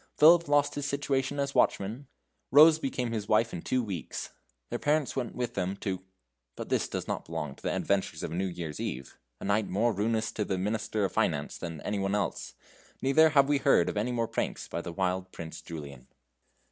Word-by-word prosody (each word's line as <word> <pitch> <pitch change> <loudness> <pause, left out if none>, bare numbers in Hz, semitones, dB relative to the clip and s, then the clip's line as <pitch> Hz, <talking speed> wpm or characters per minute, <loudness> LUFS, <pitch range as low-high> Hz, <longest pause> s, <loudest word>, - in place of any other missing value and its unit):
Philip 170 +2 +7
lost 145 0 +3
his 145 -1 -3
situation 140 0 -1
as 140 0 -1
watchman. 115 +8 +1 0.4
Rose 155 +3 +8
became 125 -4 -2
his 110 -3 -3
wife 110 +2 +3
in 85 - -4
two 130 +6 0
weeks; 95 -7 -5 0.4
their 120 - -2
parents 150 -1 +1
went 120 - -3
with 120 -1 -2
them 95 -1 -1
to; 95 -3 -3 0.5
but - - -7
this - - +1
does - - -4
not - - -3
belong 75 -2 -4
to - - -19
the - - -1
adventures 95 -5 -1
of - - -3
a - - -3
New 95 +2 0
Year's 85 -4 -5
Eve, 65 0 -5 0.2
a - - -7
night 100 +2 +1
more 110 +5 +1
ruinous 110 +2 0
to 105 - -2
the 95 -2 -2
Minister 105 +1 -1
of - - -2
Finance 80 -10 -1
than 80 -3 -6
any 105 - -2
one 95 +1 0
else; 105 - -2 0.5
neither 155 +4 +6
have 140 -3 +5
we 145 -1 +2
heard 85 - +4
of - - -4
any 110 +4 0
more 115 -2 0
pranks - - -3
by 85 - -4
the 85 - -6
wild 95 +1 -1
Prince 80 -1 -8
Julian. 70 -6 -9
110 Hz, 210 wpm, -29 LUFS, 90-135 Hz, 0.5 s, Rose